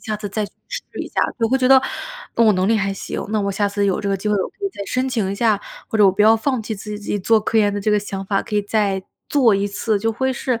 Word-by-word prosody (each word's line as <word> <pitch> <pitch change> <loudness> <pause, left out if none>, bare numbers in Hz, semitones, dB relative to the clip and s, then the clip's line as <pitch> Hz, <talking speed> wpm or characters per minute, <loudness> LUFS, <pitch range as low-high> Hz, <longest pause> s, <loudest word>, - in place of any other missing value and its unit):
下 215 -1 -3
次 210 -1 -5
再 210 +2 -2
去 - - -18 0.2
试 - - -4 0.2
一 - - -7
下， - - -1 0.2
对， 225 -1 +1
会 260 - +3
觉 255 - +2
得： 265 0 +8 0.5
“嗯， 230 - +4
我 215 - +6
能 185 0 +1
力 225 - +3
还 195 -2 0
行， 195 - -5
那 215 -1 +1
我 200 0 -1
下 200 +1 0
次 200 0 -1
有 195 - 0
这 200 - -2
个 195 - +1
机 195 +3 -3
会 210 - +2
我 190 - -1
可 - - -40
以 - - +1
再 200 - -7
申 255 +6 -1
请 220 -7 -1
一 - - -2
下， 215 -1 +2 0.3
或 220 - -2
者 210 - +7
我 195 - +7
不 190 +3 +1
要 220 +1 +6
放 255 +2 -1
弃 220 - -5
自 210 +1 -8
己 - - -3
自 205 - -13
己 205 - -1
做 220 +3 +3
科 225 +1 +1
研 205 -1 +3
的 205 - -2
这 215 - 0
个 210 - +4
想 195 -1 -5
法， 195 0 0
可 - - -7
以 205 - +2
再 200 -2 0 0.3
做 260 -6 +4
一 200 +1 0
次。” 205 +1 -1
就 225 +2 0
会 260 +4 0
是 250 -1 -2
210 Hz, 350 characters per minute, -20 LUFS, 200-225 Hz, 0.5 s, 得